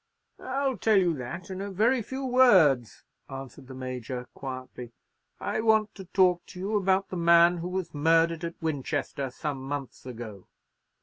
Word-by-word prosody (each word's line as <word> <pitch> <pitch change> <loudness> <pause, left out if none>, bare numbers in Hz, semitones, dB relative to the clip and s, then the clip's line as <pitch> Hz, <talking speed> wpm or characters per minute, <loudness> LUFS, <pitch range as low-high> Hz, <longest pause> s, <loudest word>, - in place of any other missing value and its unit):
"I'll 265 0 -1
tell 220 -2 +3
you 180 -3 +3
that 130 +9 -7
in 190 0 -5
a 200 - -4
very 230 +6 +2
few 265 +5 -5
words," 185 - +4 0.3
answered 135 0 -9
the 130 - -9
Major, 130 -1 -5
quietly; 130 -2 -8 0.5
"I - - -2
want 220 -1 +3
to 190 - -10
talk 180 -1 +3
to 180 - -11
you 200 +4 -2
about 195 -1 +1
the 185 - -4
man 170 +1 +5
who 175 +1 -4
was 185 -1 -4
murdered 165 +2 +2
at 170 0 -5
Winchester 145 -3 -2
some 140 +2 -4
months 135 0 -6
ago." 110 -6 -8
170 Hz, 165 wpm, -27 LUFS, 135-195 Hz, 0.5 s, man